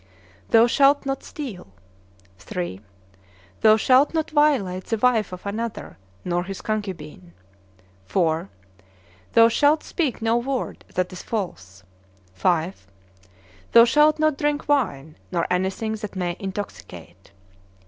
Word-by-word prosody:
Thou 225 Hz, 0 st, +6 dB
shalt 275 Hz, +4 st, +3 dB
not 270 Hz, -1 st, -2 dB
steal. 250 Hz, -, -8 dB, 0.8 s
III. 175 Hz, -, -4 dB, 0.8 s
Thou 215 Hz, 0 st, +6 dB
shalt 260 Hz, +7 st, +3 dB
not 320 Hz, 0 st, -1 dB
violate 270 Hz, -12 st, +2 dB
the 225 Hz, -, -1 dB
wife 225 Hz, -4 st, +2 dB
of 180 Hz, +1 st, -9 dB
another, 215 Hz, -, -5 dB, 0.3 s
nor 175 Hz, 0 st, -1 dB
his 195 Hz, 0 st, -6 dB
concubine. 170 Hz, -, -5 dB, 0.8 s
IV. 165 Hz, -, 0 dB, 0.9 s
Thou 230 Hz, 0 st, +7 dB
shalt 290 Hz, +6 st, +2 dB
speak 310 Hz, -8 st, -2 dB
no 225 Hz, +1 st, +1 dB
word 255 Hz, +1 st, -3 dB
that 185 Hz, 0 st, -1 dB
is 180 Hz, -, -7 dB
false. 100 Hz, -, -5 dB, 0.5 s
V. 160 Hz, -, +1 dB, 1.0 s
Thou 230 Hz, 0 st, +9 dB
shalt 300 Hz, +5 st, +4 dB
not 310 Hz, -2 st, +1 dB
drink 295 Hz, 0 st, -1 dB
wine, 160 Hz, -, -1 dB
nor 170 Hz, -2 st, 0 dB
anything 190 Hz, +4 st, -1 dB
that 210 Hz, -2 st, -6 dB
may 175 Hz, -2 st, -2 dB
intoxicate. 95 Hz, -, -8 dB
215 Hz, 120 wpm, -23 LUFS, 180-265 Hz, 1.0 s, Thou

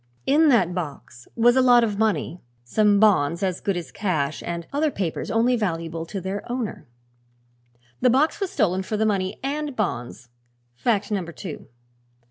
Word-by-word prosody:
In 305 Hz, +2 st, +4 dB
that 190 Hz, -9 st, +3 dB
box 145 Hz, -8 st, -7 dB
was 240 Hz, +1 st, +4 dB
a 260 Hz, -, +5 dB
lot 245 Hz, -2 st, +6 dB
of 210 Hz, -3 st, -1 dB
money, 180 Hz, -5 st, 0 dB, 0.2 s
some 205 Hz, -, +3 dB
bonds 180 Hz, -5 st, +3 dB
as 185 Hz, -2 st, -1 dB
good 195 Hz, -3 st, -1 dB
as 175 Hz, -, -6 dB
cash 155 Hz, -8 st, -1 dB
and 170 Hz, -1 st, -4 dB
other 300 Hz, +2 st, +2 dB
papers 185 Hz, -, -3 dB
only 235 Hz, +2 st, +2 dB
valuable 165 Hz, -6 st, -3 dB
to 195 Hz, -, -5 dB
their 190 Hz, +2 st, -4 dB
owner. 245 Hz, -, -4 dB, 1.1 s
The 250 Hz, -, +4 dB
box 275 Hz, +6 st, +2 dB
was 390 Hz, -2 st, -1 dB
stolen 190 Hz, -, +1 dB
for 210 Hz, +3 st, -3 dB
the 220 Hz, -, +1 dB
money 190 Hz, -3 st, -1 dB
and 290 Hz, 0 st, -3 dB
bonds; 125 Hz, -, -3 dB, 0.4 s
fact 210 Hz, -, 0 dB
number 185 Hz, -5 st, -2 dB
two. 170 Hz, -2 st, -8 dB
200 Hz, 165 wpm, -24 LUFS, 170-240 Hz, 1.1 s, lot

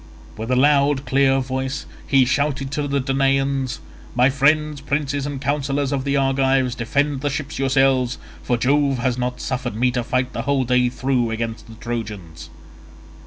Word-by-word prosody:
With 110 Hz, +2 st, -6 dB
a 130 Hz, -, +2 dB
loud 140 Hz, +1 st, +3 dB
clear 135 Hz, +1 st, +3 dB
voice 130 Hz, +1 st, -3 dB, 0.2 s
he 135 Hz, -2 st, +4 dB
shouted 140 Hz, +1 st, -1 dB
to 145 Hz, -1 st, -2 dB
the 140 Hz, 0 st, 0 dB
Danaans, 135 Hz, 0 st, 0 dB, 0.4 s
"My 125 Hz, +2 st, +4 dB
friends, 150 Hz, +1 st, +2 dB
princes 140 Hz, 0 st, -2 dB
and 145 Hz, -2 st, -4 dB
counsellors 140 Hz, 0 st, -1 dB
of 135 Hz, -1 st, -2 dB
the 140 Hz, 0 st, +1 dB
Argives, 135 Hz, -1 st, +2 dB
defend 140 Hz, +4 st, -1 dB
the 145 Hz, -, 0 dB
ships 140 Hz, 0 st, -4 dB
yourselves, 135 Hz, -2 st, +2 dB, 0.2 s
for 120 Hz, -, 0 dB
Jove 140 Hz, +2 st, +2 dB
has 125 Hz, 0 st, -1 dB
not 125 Hz, 0 st, -2 dB
suffered 125 Hz, -4 st, -3 dB
me 125 Hz, +3 st, +2 dB
to 125 Hz, -1 st, -1 dB
fight 125 Hz, +1 st, -1 dB
the -, -, -3 dB
whole 140 Hz, -2 st, +1 dB
day 125 Hz, 0 st, +2 dB
through 125 Hz, -2 st, 0 dB
against 115 Hz, 0 st, -4 dB
the 115 Hz, -, -12 dB
Trojans." 105 Hz, -8 st, -6 dB
135 Hz, 165 wpm, -21 LUFS, 125-140 Hz, 0.4 s, he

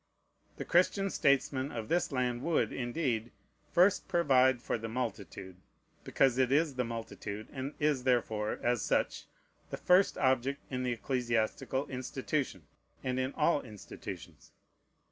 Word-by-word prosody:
The -, -, -5 dB
Christian 195 Hz, +2 st, +2 dB
statesmen 140 Hz, 0 st, +1 dB
of 115 Hz, -2 st, -5 dB
this 175 Hz, +3 st, +1 dB
land 125 Hz, -2 st, -1 dB
would, 165 Hz, +3 st, +1 dB
indeed, 120 Hz, -3 st, -2 dB, 0.4 s
first 185 Hz, +3 st, +4 dB
provide 130 Hz, -6 st, +4 dB
for -, -, -2 dB
the 115 Hz, 0 st, -5 dB
multitude, 100 Hz, -6 st, -5 dB, 0.5 s
because 130 Hz, -2 st, +2 dB
it 130 Hz, -1 st, +3 dB
is 150 Hz, +1 st, +3 dB
the 125 Hz, -1 st, -1 dB
multitude, 110 Hz, -2 st, -6 dB
and 135 Hz, +1 st, -5 dB
is 145 Hz, -4 st, +1 dB
therefore, 110 Hz, -4 st, 0 dB
as 120 Hz, -2 st, +1 dB
such, -, -, 0 dB, 0.4 s
the -, -, -4 dB
first 185 Hz, +2 st, +4 dB
object 130 Hz, +1 st, +1 dB
in 130 Hz, -1 st, -2 dB
the 125 Hz, -1 st, 0 dB
ecclesiastical 120 Hz, +2 st, -1 dB
institution, 130 Hz, +2 st, -3 dB, 0.4 s
and 130 Hz, 0 st, -1 dB
in 130 Hz, +1 st, -1 dB
all 150 Hz, -1 st, +2 dB
institutions. 105 Hz, -5 st, -10 dB
130 Hz, 135 wpm, -32 LUFS, 120-140 Hz, 0.5 s, first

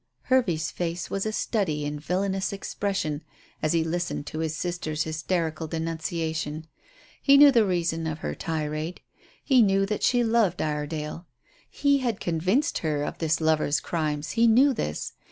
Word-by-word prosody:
Hervey's 180 Hz, -12 st, +1 dB
face 170 Hz, 0 st, -3 dB
was 195 Hz, +2 st, -1 dB
a -, -, -1 dB
study 180 Hz, -10 st, -1 dB
in 145 Hz, 0 st, -3 dB
villainous 190 Hz, +4 st, -1 dB
expression 195 Hz, -6 st, -2 dB, 0.4 s
as 155 Hz, -, +1 dB
he 165 Hz, -1 st, +2 dB
listened 170 Hz, -2 st, -2 dB
to 155 Hz, -, -5 dB
his 160 Hz, -1 st, -1 dB
sister's 160 Hz, -3 st, -2 dB
hysterical 160 Hz, 0 st, -2 dB
denunciation. 160 Hz, -1 st, -3 dB, 0.6 s
He 280 Hz, 0 st, +6 dB
knew 285 Hz, 0 st, +9 dB
the 230 Hz, -5 st, +4 dB
reason 165 Hz, -3 st, 0 dB
of 155 Hz, -1 st, -3 dB
her -, -, -1 dB
tirade. 155 Hz, +1 st, -3 dB, 0.4 s
He 260 Hz, -4 st, +5 dB
knew 195 Hz, -2 st, +3 dB
that 210 Hz, +1 st, -3 dB
she 245 Hz, -1 st, +3 dB
loved 225 Hz, -6 st, +2 dB
Iredale. 150 Hz, +2 st, -3 dB, 0.4 s
He 280 Hz, -1 st, +2 dB
had 240 Hz, -5 st, -1 dB
convinced 185 Hz, -, 0 dB
her 150 Hz, -3 st, -1 dB
of -, -, -5 dB
this 160 Hz, -1 st, +1 dB
lover's 155 Hz, -2 st, +2 dB
crimes; 155 Hz, -2 st, -2 dB
he 230 Hz, 0 st, +4 dB
knew 260 Hz, +5 st, +5 dB
this. 75 Hz, -, -3 dB
165 Hz, 155 wpm, -26 LUFS, 155-200 Hz, 0.6 s, knew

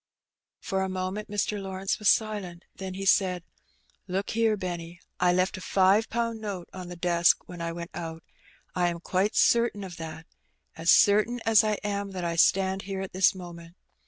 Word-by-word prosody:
For 190 Hz, -1 st, -2 dB
a 190 Hz, -, -1 dB
moment 185 Hz, +3 st, -4 dB
Mr. 205 Hz, 0 st, -1 dB
Lawrence 190 Hz, 0 st, -3 dB
was 210 Hz, -, +3 dB
silent, 205 Hz, -6 st, 0 dB
then 190 Hz, -1 st, -6 dB
he 195 Hz, +1 st, -5 dB
said 180 Hz, -1 st, +3 dB, 0.2 s
— -, -, -39 dB
" -, -, -39 dB
Look 190 Hz, +2 st, -2 dB
here, 225 Hz, -1 st, +2 dB
Benny. 175 Hz, -2 st, -6 dB, 0.2 s
T 180 Hz, -, +4 dB
left 185 Hz, +1 st, +1 dB
a -, -, -8 dB
five 195 Hz, +4 st, +3 dB
pound 230 Hz, -1 st, -2 dB
note 195 Hz, -5 st, -5 dB
on 185 Hz, -1 st, -7 dB
the 175 Hz, -, -7 dB
desk 170 Hz, -1 st, +2 dB
when 175 Hz, -1 st, -8 dB
I 170 Hz, 0 st, -2 dB
went 170 Hz, 0 st, -7 dB
out. 165 Hz, -1 st, -6 dB, 0.5 s
I 180 Hz, -1 st, +1 dB
am 170 Hz, -1 st, -2 dB
quite 190 Hz, +5 st, 0 dB
certain 235 Hz, -3 st, +3 dB
of 180 Hz, -3 st, -8 dB
that 160 Hz, 0 st, -8 dB, 0.3 s
— -, -, -46 dB
as 165 Hz, +1 st, -2 dB
certain 215 Hz, +4 st, +4 dB
as 225 Hz, -1 st, +5 dB
I 215 Hz, -1 st, +1 dB
am 200 Hz, -1 st, -3 dB
that 180 Hz, -2 st, -4 dB
I 170 Hz, 0 st, -1 dB
stand 190 Hz, +3 st, +3 dB
here 190 Hz, -1 st, -3 dB
at 195 Hz, -, -6 dB
this 185 Hz, +1 st, +4 dB
moment. 170 Hz, -2 st, -10 dB
190 Hz, 200 wpm, -27 LUFS, 175-205 Hz, 0.5 s, as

